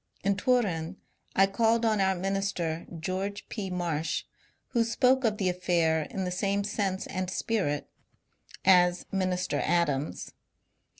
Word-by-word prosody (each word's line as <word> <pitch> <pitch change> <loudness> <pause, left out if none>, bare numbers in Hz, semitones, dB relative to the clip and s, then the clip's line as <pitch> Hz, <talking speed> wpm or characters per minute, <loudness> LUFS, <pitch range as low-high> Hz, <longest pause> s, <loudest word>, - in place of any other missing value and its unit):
In 200 +1 +2
Turin 200 -7 0 0.4
I 195 - +6
called 225 +3 +2
on 215 -3 +2
our 190 0 +2
minister, 185 -3 -2
George 190 +4 -3
P. 200 -4 -4
Marsh, 165 -3 -1 0.5
who 235 -3 +2
spoke 255 +3 +3
of 215 -3 +1
the 195 - 0
affair 170 -3 +1
in 190 - -3
the 180 - -2
same 200 +2 0
sense 195 -2 -1
and 185 -1 -3
spirit 185 -8 -1 0.8
as 180 -1 +5
Minister 185 -2 0
Adams. 155 -4 0
190 Hz, 130 wpm, -28 LUFS, 175-205 Hz, 0.8 s, I